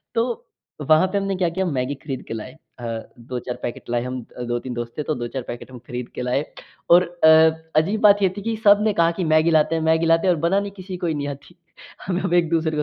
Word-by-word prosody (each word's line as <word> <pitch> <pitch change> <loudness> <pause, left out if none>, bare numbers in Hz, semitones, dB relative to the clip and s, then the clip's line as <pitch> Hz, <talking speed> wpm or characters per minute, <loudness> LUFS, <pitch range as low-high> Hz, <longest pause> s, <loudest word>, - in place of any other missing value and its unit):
तो 235 0 -1 0.4
वहाँ 155 +4 +6
पे 200 +2 -2
हमने 195 -1 -1
क्या 180 -2 +1
किया 190 +3 -2
मैगी 140 -4 -2
खरीद 135 -2 -6
के - - -5
लाए। 115 +3 -7 0.3
अ, 120 - -7 0.3
2-4 125 +1 -5
पैकेट 120 - -6
लाए। 120 0 0
हम 125 0 -4 0.3
2-3 120 +1 -3
दोस्त 120 0 -5
थे 150 - -2
तो 155 - -2
2-4 120 +1 -4
पैकेट 120 +2 -8 0.2
खरीद 125 0 -5
के - - -4
लाए 125 +4 0 0.5
और 180 - +3 0.2
अ, 160 - +8 0.5
अजीब 205 +6 -2
बात 205 -1 +6
ये 190 - +4
थी - - -4
कि 225 +2 -2
सबने 205 +1 +5
कहा 170 -1 +3
कि, 180 +2 -3
"मैगी 155 +1 +3
लाते 155 0 +3
हैं 160 - -1
मैगी 160 +1 +2
लाते 165 +3 +3
हैं" 180 - +5
और - - -6
बनानी 195 +4 +1
किसी 185 -1 -6
को 175 - -3
ही 160 - 0
नी - - -3
आती। 145 +5 -16 0.5
हम 185 -1 -1
एक-दूसरे 165 -2 +1
160 Hz, 230 wpm, -22 LUFS, 130-185 Hz, 0.5 s, अ